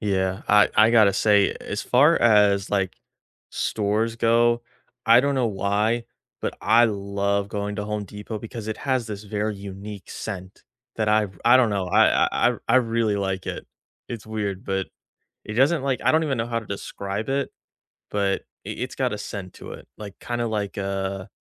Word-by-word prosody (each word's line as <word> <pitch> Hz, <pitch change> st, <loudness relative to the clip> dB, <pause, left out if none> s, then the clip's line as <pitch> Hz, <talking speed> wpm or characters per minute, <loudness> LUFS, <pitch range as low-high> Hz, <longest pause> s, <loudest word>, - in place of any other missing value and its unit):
Yeah, 95 Hz, -2 st, -1 dB
I 105 Hz, 0 st, +6 dB
I 110 Hz, +1 st, +6 dB
gotta 110 Hz, -4 st, +5 dB
say, 100 Hz, 0 st, +3 dB
as -, -, -4 dB
far 145 Hz, +7 st, +4 dB
as, 105 Hz, -3 st, +4 dB
like, 95 Hz, -2 st, -1 dB, 0.5 s
stores 110 Hz, +2 st, -1 dB
go, 120 Hz, +1 st, +3 dB, 0.4 s
I 115 Hz, +2 st, +7 dB
don't 140 Hz, 0 st, 0 dB
know 125 Hz, -3 st, +1 dB
why, 105 Hz, +3 st, 0 dB, 0.4 s
but -, -, -3 dB
I 120 Hz, +1 st, +5 dB
love 100 Hz, -1 st, -1 dB
going 105 Hz, 0 st, -4 dB
to 105 Hz, -, -3 dB
Home 105 Hz, 0 st, -3 dB
Depot 105 Hz, +2 st, -7 dB
because 115 Hz, -1 st, -8 dB
it 110 Hz, 0 st, -4 dB
has 130 Hz, -4 st, -1 dB
this 105 Hz, -1 st, -7 dB
very 105 Hz, +1 st, -2 dB
unique 100 Hz, +1 st, -9 dB
scent 95 Hz, -2 st, -7 dB, 0.3 s
that 110 Hz, -1 st, 0 dB
I've 105 Hz, -4 st, +1 dB
I -, -, +7 dB
don't 120 Hz, -4 st, +3 dB
know, 100 Hz, -2 st, -1 dB
I 90 Hz, -, +4 dB
I -, -, +2 dB
I -, -, -7 dB
I 115 Hz, -, +5 dB
really 115 Hz, -3 st, +1 dB
like 95 Hz, -1 st, -2 dB
it. -, -, -5 dB, 0.4 s
It's 115 Hz, -3 st, -7 dB
weird, 105 Hz, -3 st, -4 dB
but, 95 Hz, -1 st, -1 dB, 0.6 s
it 105 Hz, -, -5 dB
doesn't 135 Hz, +6 st, +3 dB
like, 135 Hz, -2 st, -1 dB
I -, -, +4 dB
don't 160 Hz, +1 st, +3 dB
even 135 Hz, -4 st, -1 dB
know 115 Hz, -, -1 dB
how 115 Hz, -1 st, -1 dB
to 115 Hz, -, -13 dB
describe 100 Hz, +2 st, -5 dB
it, 140 Hz, +1 st, -1 dB, 0.6 s
but 100 Hz, -1 st, 0 dB, 0.2 s
i -, -, -6 dB
it's -, -, -5 dB
got -, -, 0 dB
a -, -, -3 dB
scent 100 Hz, -3 st, -7 dB
to -, -, -10 dB
it, -, -, -13 dB
like, 100 Hz, -2 st, -10 dB
kinda 120 Hz, 0 st, -3 dB
like 105 Hz, -2 st, -3 dB
a 95 Hz, 0 st, -3 dB
105 Hz, 190 wpm, -24 LUFS, 100-115 Hz, 0.6 s, I